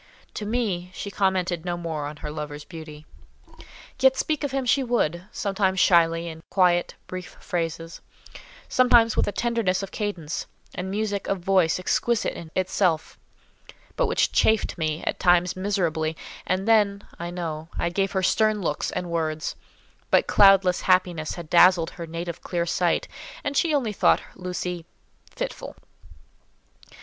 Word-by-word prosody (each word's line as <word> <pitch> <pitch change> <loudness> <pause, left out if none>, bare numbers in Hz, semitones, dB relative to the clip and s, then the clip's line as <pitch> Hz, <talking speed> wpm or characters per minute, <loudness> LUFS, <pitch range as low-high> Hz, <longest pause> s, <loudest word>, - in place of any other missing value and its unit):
To 210 - -5
me, 205 -6 -1
she 200 - -5
commented 185 -4 0
no 175 -1 -2
more 160 -4 -4
on 150 - -7
her 150 - -4
lover's 150 -1 -6
beauty. 155 -3 -10 0.9
Yet 265 0 +5
speak 305 -2 -1
of 285 - 0
him 270 -1 -2
she 260 +3 +3
would; 180 -8 0
sometimes 195 -2 0
shyly, 170 -2 +4
in 160 -1 -8
quiet, 175 -2 +2
brief 185 -1 -8
phrases; 165 -1 -4 0.7
sometimes 240 -3 +4
with - - +1
a - - 0
tenderness 210 -3 0
of 195 - -6
cadence, 185 -8 -4 0.3
and 185 +1 -4
music 205 0 -2
of 195 -2 -1
voice 185 -3 +3
exquisite 225 +5 0
in 165 - -9
itself; 185 -3 0 0.8
but - - +1
which 450 - +1
chafed 220 -1 +2
me 155 -2 -2
at - - -2
times 175 0 +3
miserably; 170 -5 -1 0.3
and 185 +3 0
then, 205 -3 +3 0.2
I 170 +1 -4
know, 165 -3 -5
I 170 - 0
gave 195 +2 -1
her 190 -1 0
stern 215 +2 +2
looks 155 -6 -2
and 180 - -4
words; 160 -1 -2 0.5
but - - +4
cloudless 195 -2 +5
happiness 180 -4 +1
had 170 -2 -8
dazzled 175 0 +5
her 170 -1 -8
native 170 +1 -5
clear 170 -1 -2
sight, 175 0 0 0.4
and 285 - -2
she 330 +3 +2
only 255 -8 0
thought - - +3
Lucy—fitful. 180 - -7
180 Hz, 150 wpm, -25 LUFS, 165-205 Hz, 0.9 s, Yet